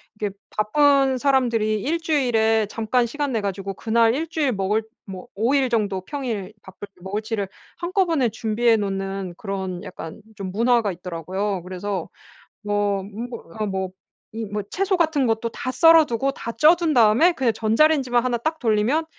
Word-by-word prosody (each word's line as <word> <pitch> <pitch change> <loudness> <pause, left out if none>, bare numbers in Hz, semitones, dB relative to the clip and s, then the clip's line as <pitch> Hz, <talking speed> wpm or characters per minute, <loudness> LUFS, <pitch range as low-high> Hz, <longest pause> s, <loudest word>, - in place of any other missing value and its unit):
이게 210 -2 -3 0.2
바쁜 270 +4 +3
사람들이 235 -6 +1
1 330 +4 -1
주일에 225 -8 +2
잠깐 230 +3 0
시간 285 +3 -3
내 225 - 0
가지고 195 -1 -4
그날 230 +1 +2
1 320 +3 -2
주일 300 -5 0
먹을 210 +2 0 0.2
뭐 190 -2 -9
5 230 +7 +1
일 270 -2 +2
정도 205 -5 0
평일 225 -5 -4
밥을 190 +2 -11
먹을 200 +3 -3
치를 220 -2 -3 0.3
한꺼번에 345 -6 +1
준비해 225 +1 +1
놓는 195 -3 -3
그런 190 -3 -4
약간 165 +3 -9
좀 195 -3 -5
문화가 230 0 +2
있더라고요. 180 +2 -4
그래서 185 0 -4 0.5
뭐 205 -1 0
뭐 225 +5 -7 0.2
어 215 - 0
뭐 190 -1 -2 0.4
이 225 0 -4
뭐 205 +1 -4
채소 390 0 0
같은 315 -6 +2
것도 225 +1 0
다 250 - -5
썰어 325 +4 +6
두고 270 +1 -1
다 230 - -6
쪄 310 +7 +7
둔 335 -4 -1
다음에 240 +10 +5
그냥 255 -7 +1
전자레인지만 245 +2 +2
1 245 -1 0
딱 315 +7 -2
돌리면 235 +7 +1
225 Hz, 305 characters per minute, -23 LUFS, 200-270 Hz, 0.5 s, 쪄